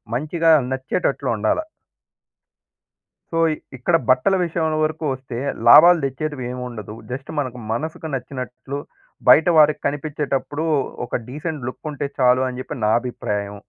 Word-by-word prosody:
మంచిగా 160 +5 0 0.2
నచ్చేటట్లు 130 +1 -1
ఉండాలా. 110 - 0 1.7
సో, 165 - +1
ఇక్ - - -9 0.2
ఇక్కడ 145 +8 +1
బట్టల 130 +10 +4
విషయం 160 -2 -1
వరకు 155 +1 -2
వస్తే 130 -2 -6 0.3
లాభాలు 170 +7 +9
తెచ్చేటివి 135 0 -4
ఏమి 125 0 -6
ఉండదు. 110 -3 -8 0.2
జస్ట్ 135 +3 -6
మనకు 125 -3 -3
మనసుకు 155 +7 -4
నచ్చినట్లు 130 +1 -6 0.5
బయట 160 - +7
వారికి 150 -1 +5
కనిపించేటప్పుడు 145 0 -3 0.4
ఒక 120 - -5
డీసెంట్ 150 0 -5
లుక్ 125 - -8
ఉంటే 145 -1 -4
చాలు 125 0 +4
అని 125 0 -7
చెప్పి 130 - -6
నా - - +3
అభిప్రాయం. 105 -5 -4
135 Hz, 130 wpm, -21 LUFS, 125-155 Hz, 1.7 s, లాభాలు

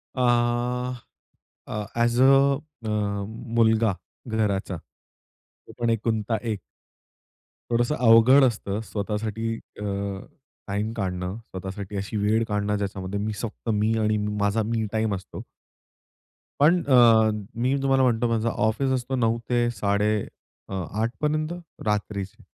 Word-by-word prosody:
अह 125 0 +1 0.7
अ, 105 -1 -3
as 120 +1 +2
a - - +7
अ, 140 -1 +2 0.7
मुलगा 110 -2 +4 0.3
घराचा. 100 -5 -1 0.4
तो - - -22
पण 120 -1 +1
एकुलता 110 0 0
एक. 110 -4 -2 1.1
थोडंसं 120 +5 +2
अवघड 125 +2 +6
असतं 105 -5 0
स्वतःसाठी 110 +2 -3 0.3
अ, - - -5 0.8
टाइम 105 +2 -2
काढणं, 90 -1 -2
स्वतःसाठी 95 -2 -7
अशी 100 +2 -3
वेळ 105 +2 +2
काढणं 105 -1 0
ज्याच्यामध्ये 100 -1 -3
मी 105 +1 -2
फक्त 115 0 -5
मी 110 +1 +1
आणि 110 0 +2
माझा 105 +1 0
मी 110 0 -1
टाइम 110 -2 0
असतो. 95 - -8 1.2
पण 170 +5 +5
अ, 115 -5 +6 0.3
मी 130 +3 +2
तुम्हाला 135 -1 +3
म्हणतो 120 -1 +2
माझा 115 0 +1 0.2
ऑफिस 130 +5 0
असतो 130 +1 -1
9.00 115 -2 +2
ते 120 -1 +2
साडे 100 +1 +1 0.6
अ, - - -6 0.3
आठपर्यंत 150 +7 -1 0.3
रात्रीचे. 105 -2 -2
115 Hz, 120 wpm, -25 LUFS, 105-120 Hz, 1.2 s, अ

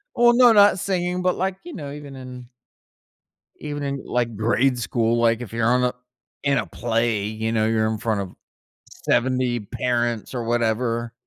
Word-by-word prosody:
Well, 240 -1 +5
no, 245 -1 +7
not 205 -2 +6
singing, 180 -1 -1
but, 180 0 +1
like, 190 0 -1
you 345 -2 -9
know, 140 -3 -7
even 145 -1 -9
in 125 -1 -10 1.1
even 145 -1 -5
in, 140 -1 -3
like, 120 -2 -1
grade 120 +4 +1
school, 115 0 0
like, 115 0 +2
if 115 -2 -8
you're 115 -1 +1
on 125 +1 +3
a 125 - +1 0.5
in 140 -1 +2
a - - 0
play, 115 -2 -1
you 110 +1 -3
know, 110 -1 +2
you're 110 0 +1
in 110 - -2
front 110 -1 -1
of 95 -2 -8 0.7
70 125 -1 +1
parents 120 +2 -2
or 120 -2 -3
whatever. 115 0 0
120 Hz, 175 wpm, -23 LUFS, 115-140 Hz, 1.1 s, no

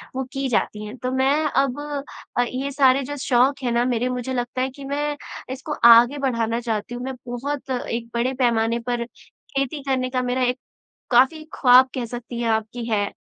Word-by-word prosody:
वो 265 - -1
की 270 -1 -1
जाती 215 -2 -1
हैं। 210 +3 -8
तो 255 +2 -3
मैं 265 +2 +2
अब 275 -2 +1 0.6
अ, - - +5
ये 260 +3 -3
सारे 270 -1 +4
जो 290 +3 -5
शौक 265 +2 +2
हैं 245 - 0
ना 235 +1 +2
मेरे 245 0 0
मुझे 250 +1 -3
लगता 245 +1 -2
है 260 - 0
कि 275 +2 -12
मैं 290 +1 -2 0.4
इसको 280 +3 -5 0.2
आगे 240 +5 +5
बढ़ाना 230 -4 0
चाहती 230 +1 -3
हूँ, 245 - -6
मैं 265 0 -4
बहुत 265 +4 -4
एक 235 -2 -3
बड़े 240 +2 0
पैमाने 235 -2 +1
पर 240 -1 -1
खेती 275 +3 -6
करने 260 -2 0
का 255 0 -1
मेरा 250 +1 0
एक 250 0 +1 0.5
काफ़ी 265 +6 +4
ख्वाब 255 0 +6
कह 250 -2 -2
सकतीं 240 0 -7
हैं - - 0
कि - - +4
आप 220 0 -6
कि 240 -1 -5
है। 205 -2 0
255 Hz, 205 wpm, -23 LUFS, 240-270 Hz, 0.6 s, ख्वाब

